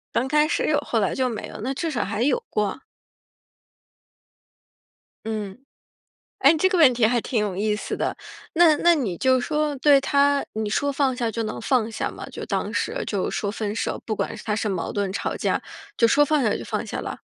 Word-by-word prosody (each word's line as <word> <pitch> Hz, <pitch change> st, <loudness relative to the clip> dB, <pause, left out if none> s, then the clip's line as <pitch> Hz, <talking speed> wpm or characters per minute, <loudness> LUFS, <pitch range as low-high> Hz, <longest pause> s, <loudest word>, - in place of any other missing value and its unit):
刚 260 Hz, +3 st, +1 dB
开 300 Hz, +1 st, +3 dB
始 -, -, 0 dB
有 305 Hz, -, +3 dB
后 235 Hz, -6 st, -1 dB
来 195 Hz, -, 0 dB
就 260 Hz, -1 st, 0 dB
没 225 Hz, -4 st, -5 dB
了， -, -, -9 dB
那 260 Hz, +5 st, -2 dB
至 325 Hz, +4 st, -3 dB
少 240 Hz, -7 st, -1 dB
还 205 Hz, +2 st, -3 dB
有 265 Hz, 0 st, +2 dB
过。 210 Hz, +1 st, -1 dB, 2.5 s
嗯。 210 Hz, -3 st, -4 dB, 0.8 s
哎， 275 Hz, +3 st, +7 dB
你 320 Hz, -, -1 dB
这 375 Hz, -, +4 dB
个 370 Hz, -, 0 dB
问 305 Hz, -7 st, +7 dB
题 235 Hz, -2 st, +3 dB
还 240 Hz, +2 st, +2 dB
挺 230 Hz, -, -1 dB
有 205 Hz, -3 st, -2 dB
意 210 Hz, +2 st, +1 dB
思 210 Hz, -, -4 dB
的。 -, -, -1 dB, 0.4 s
那 330 Hz, -2 st, +5 dB
那 345 Hz, +3 st, +4 dB
你 230 Hz, -, -2 dB
就 260 Hz, +3 st, +3 dB
说 300 Hz, +2 st, -1 dB
对 280 Hz, +1 st, +5 dB
他， 280 Hz, +1 st, +2 dB
你 220 Hz, -1 st, -2 dB
说 285 Hz, +7 st, 0 dB
放 270 Hz, -2 st, +1 dB
下 235 Hz, -2 st, -1 dB
就 230 Hz, +1 st, -3 dB
能 215 Hz, -, -4 dB
放 230 Hz, -2 st, +1 dB
下 220 Hz, -, -3 dB
吗？ -, -, -9 dB
就 -, -, -7 dB
当 -, -, -2 dB
时 -, -, -1 dB
就 200 Hz, -3 st, -1 dB
说 200 Hz, -, -2 dB
分 210 Hz, -1 st, -3 dB
手， -, -, -2 dB
不 220 Hz, -, -2 dB
管 -, -, -3 dB
他 210 Hz, -, 0 dB
是 215 Hz, 0 st, -1 dB
矛 185 Hz, -4 st, -3 dB
盾 200 Hz, -2 st, -1 dB
吵 195 Hz, -, -3 dB
架， -, -, -1 dB, 0.3 s
就 230 Hz, -, +5 dB
说 275 Hz, +6 st, +4 dB
放 290 Hz, 0 st, +2 dB
下 215 Hz, -4 st, +2 dB
就 -, -, -5 dB
放 -, -, -3 dB
下 -, -, -4 dB
了？ -, -, -6 dB
245 Hz, 230 characters per minute, -24 LUFS, 215-285 Hz, 2.5 s, 哎